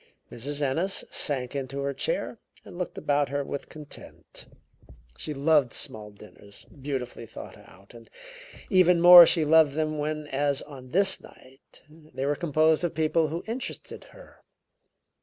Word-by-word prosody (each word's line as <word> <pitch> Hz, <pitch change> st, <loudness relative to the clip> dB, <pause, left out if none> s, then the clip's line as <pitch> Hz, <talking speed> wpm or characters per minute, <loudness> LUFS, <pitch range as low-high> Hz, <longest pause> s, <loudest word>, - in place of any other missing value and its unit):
Mrs. 145 Hz, +5 st, -5 dB
Ennis 165 Hz, +8 st, -1 dB
sank 130 Hz, -3 st, -3 dB
into 135 Hz, 0 st, -5 dB
her 140 Hz, 0 st, -2 dB
chair -, -, -3 dB, 0.3 s
and -, -, -12 dB
looked 180 Hz, -1 st, -5 dB
about 145 Hz, -1 st, 0 dB
her 140 Hz, +1 st, -2 dB
with 140 Hz, 0 st, -7 dB
content. 150 Hz, -2 st, -12 dB, 0.7 s
She 155 Hz, -, -5 dB
loved 145 Hz, -3 st, +2 dB
small 105 Hz, -1 st, -3 dB
dinners 100 Hz, 0 st, -16 dB
beautifully 130 Hz, -4 st, -6 dB
thought -, -, -11 dB
out, 95 Hz, +3 st, -19 dB
and 115 Hz, -1 st, -15 dB, 0.6 s
even 180 Hz, -2 st, +4 dB
more 175 Hz, 0 st, +10 dB
she 160 Hz, -3 st, +2 dB
loved 155 Hz, -2 st, +4 dB
them 155 Hz, 0 st, -2 dB
when, 150 Hz, 0 st, -3 dB
as 140 Hz, 0 st, -1 dB
on 130 Hz, -3 st, -12 dB
this 190 Hz, +6 st, +2 dB
night, 130 Hz, +2 st, -19 dB
they 150 Hz, -4 st, -8 dB
were 145 Hz, -, +1 dB
composed 155 Hz, 0 st, +1 dB
of 175 Hz, -, -2 dB
people 160 Hz, +1 st, +1 dB
who 165 Hz, +3 st, -5 dB
interested 240 Hz, +4 st, -7 dB
her. -, -, -17 dB
145 Hz, 150 wpm, -26 LUFS, 135-160 Hz, 0.7 s, more